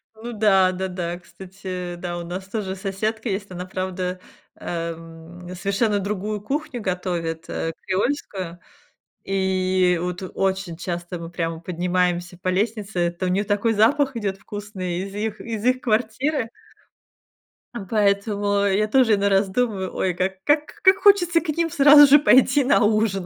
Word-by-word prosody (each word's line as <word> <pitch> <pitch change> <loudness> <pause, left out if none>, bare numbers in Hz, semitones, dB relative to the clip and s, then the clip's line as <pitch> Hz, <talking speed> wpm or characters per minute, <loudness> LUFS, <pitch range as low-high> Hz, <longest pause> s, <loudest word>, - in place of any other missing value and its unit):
Ну 235 +2 -7
да, 195 -3 +4
да, 190 +1 -3
да, 175 -1 -4
кстати, 185 -1 -7
да, 175 0 -5
у - - -5
нас 185 +2 -6
тоже 195 -2 -4
соседка 215 +4 -3
есть, 200 +1 -3
она, 180 0 -6
правда, 185 -1 -4 0.4
эм, 165 +1 -7
совершенно 200 +3 0
другую 210 +1 -3
кухню 270 0 -3
готовит, 175 -4 -3
э, 165 0 -3
креольскую. 190 -5 -2 0.7
И 185 -2 +1
вот 180 +1 -4
очень 190 -3 -1
часто 175 0 -5
мы 165 0 -8
прямо 165 -1 -3
поднимаемся 175 0 -1
по 185 - -13
лестнице. 200 -3 0
То 185 - -1
у - - 0
неё 195 +3 +1
такой 205 +2 +1
запах 270 +6 +3
идёт 200 -3 -2
вкусный 195 -3 -5
из 195 0 -7
их 215 +1 -3
из 225 -2 -5
их 255 +1 +2
квартиры. 240 +3 0 1.3
М, 195 -5 -6
поэтому 205 -1 +1
я 200 +2 +2
тоже 235 -3 +4
иной 200 0 +1
раз 195 0 +2
думаю: 200 -4 -1
"Ой, 185 -2 0
как 190 +2 -3
как 295 +1 +1
как 380 +1 +6
хочется 350 -5 +4
к 320 - -7
ним 330 +2 0
сразу 290 +1 +8
же 285 +2 +7
пойти 265 0 +5
на 255 - +3
ужин". 210 -3 +1
195 Hz, 155 wpm, -23 LUFS, 180-220 Hz, 1.3 s, сразу